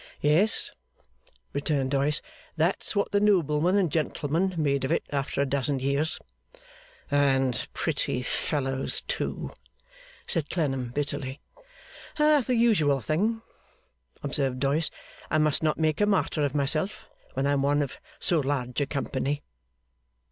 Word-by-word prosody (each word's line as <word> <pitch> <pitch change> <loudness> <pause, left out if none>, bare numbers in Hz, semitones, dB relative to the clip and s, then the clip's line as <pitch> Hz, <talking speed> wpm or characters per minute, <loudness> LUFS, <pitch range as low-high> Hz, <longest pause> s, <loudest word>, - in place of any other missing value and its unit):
'Yes,' 165 +9 +2 0.8
returned 140 -2 0
Doyce, 145 +2 +2 0.3
'that's 170 +7 +1
what 200 - +1
the 205 - +3
noblemen 180 -3 +3
and 180 -6 +2
gentlemen 165 +4 0
made 140 -3 +1
of 130 - -1
it - - +1
after 140 -1 -1
a - - +2
dozen 140 0 +1
years.' 140 +4 +1 0.9
'And 135 -3 +2
pretty 125 - -1
fellows 135 +1 -1
too!' - - -3 0.8
said 160 -6 +1
Clennam, 135 -7 -1
bitterly. 140 0 -3 0.8
'The 300 -4 +4
usual 190 -13 +3
thing!' 210 - 0 0.8
observed 135 -2 0
Doyce. 145 +4 +2 0.4
'I - - +2
must 155 -1 +3
not 155 -1 +1
make 155 +2 +1
a 205 - +4
martyr 190 -6 +1
of 145 0 -1
myself, 155 +7 0 0.3
when 135 +1 0
I 140 - +2
am 140 -1 +2
one 145 +1 +2
of 145 - -7 0.2
so 170 -4 +3
large 135 -2 -1
a 140 - 0
company. 140 0 -2
145 Hz, 135 wpm, -27 LUFS, 140-165 Hz, 0.9 s, The